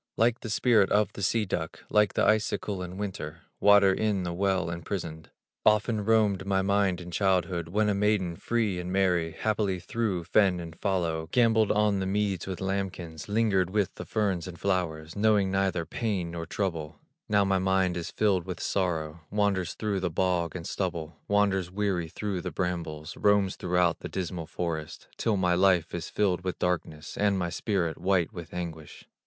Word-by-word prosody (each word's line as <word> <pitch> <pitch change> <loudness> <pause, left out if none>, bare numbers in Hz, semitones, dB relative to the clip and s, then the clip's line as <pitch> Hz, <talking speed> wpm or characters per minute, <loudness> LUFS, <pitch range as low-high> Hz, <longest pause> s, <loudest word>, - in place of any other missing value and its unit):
Like 115 +1 +3
the 115 - -7
spirit 110 -2 +3
of 105 0 +2
the - - -7
sea 110 +3 +1
duck, 80 -4 -4
Like 105 -1 +3
the - - +3
icicle 105 -2 +1
in 90 +1 -6
winter, 85 -6 -5 0.2
Water 100 -1 +6
in 105 -2 0
the 85 -1 -3
well 95 -2 0
imprisoned. 85 -2 -5 0.3
Often 105 0 +2
roamed 105 -4 +3
my 95 0 +1
mind 100 -2 +2
in 90 0 -8
childhood, 90 -2 +1
When 105 +5 +1
a 105 - +2
maiden 100 -4 +1
free 110 -2 -1
and 90 0 -5
merry, 90 -4 +1
Happily 105 -2 0
through 95 -1 -2
fen 95 +1 +3
and 85 -1 -8
fallow, 85 -5 -1
Gamboled 115 -3 +4
on 105 -2 +2
the 95 - -1
meads 100 -2 -1
with 95 -3 -4
lambkins, 95 -4 -4
Lingered 100 -4 +2
with 100 -1 0
the - - -7
ferns 95 -5 -1
and 85 -2 -9
flowers, 85 -5 -1
Knowing 100 -2 +3
neither 95 -3 0
pain 95 -7 -2
nor 85 -1 -5
trouble; 80 -6 -3 0.3
Now 100 -1 +4
my 95 -1 +2
mind 95 -1 +2
is 85 -1 -4
filled 100 -5 +1
with 90 -3 -5
sorrow, 85 -4 -1
Wanders 100 -4 0
though 105 -3 -1
the 90 -1 -1
bog 85 0 0
and 85 -2 -5
stubble, 85 -5 -3
Wanders 100 -3 +2
weary 95 -3 -1
through 95 +2 -3
the - - -4
brambles, 85 -4 -3
Roams 100 -2 +3
throughout 90 -1 +1
the - - -6
dismal 90 -3 -4
forest, 80 -3 -4
Till 110 -3 +1
my 90 -2 +2
life 90 -2 +3
is 85 -2 -4
filled 90 -4 0
with 90 -1 -3
darkness, 85 -4 -2
And 100 -1 +3
my 90 -2 -1
spirit 90 -3 -1
white 90 -1 +1
with 85 -3 -8
anguish. 80 -3 -7
95 Hz, 180 wpm, -28 LUFS, 85-100 Hz, 0.3 s, Water